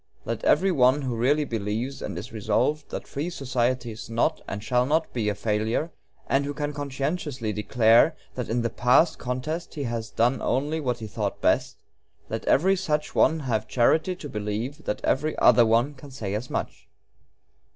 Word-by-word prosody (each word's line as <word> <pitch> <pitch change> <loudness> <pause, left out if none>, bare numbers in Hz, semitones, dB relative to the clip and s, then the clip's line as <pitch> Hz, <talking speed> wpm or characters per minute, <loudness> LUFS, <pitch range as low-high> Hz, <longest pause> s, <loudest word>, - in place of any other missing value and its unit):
Let - - -3
every 195 0 +4
one 135 -2 +3
who 125 -3 -2
really 145 +6 +2
believes, 115 +3 -3
and 100 - -5
is 110 +7 -7
resolved, 115 +8 0
that - - -6
free 150 +5 -3
society 130 -5 -1
is 110 +1 -9
not 120 +8 0
and 100 +1 -5
shall 125 +1 +1
not 160 +3 0
be 110 -4 0
a 105 - -1
failure, 110 - -1 0.3
and 135 +1 +1
who 145 0 -4
can 145 0 -3
conscientiously 140 -4 -3
declare 115 +7 +4 0.2
that 125 -3 -5
in 120 +1 0
the 115 - -1
past 125 +7 +3
contest 130 +9 -4
he 145 - -3
has 115 -3 -3
done 120 +4 +1
only 145 +5 0
what 125 -5 -1
he 115 - -7
thought 105 -1 -3
best - - +1 0.5
let - - -4
every 190 +7 +4
such 155 -5 -1
one 160 -1 +3
have 110 -5 -1
charity 155 +9 +2
to 165 - -8
believe 110 +6 -4
that 105 - -3
every 155 +3 0
other 120 -1 +6
one 120 +6 +2
can 140 +1 -13
say 110 -7 -5
as 110 +5 -3
much. - - -4
125 Hz, 185 wpm, -25 LUFS, 115-150 Hz, 0.5 s, other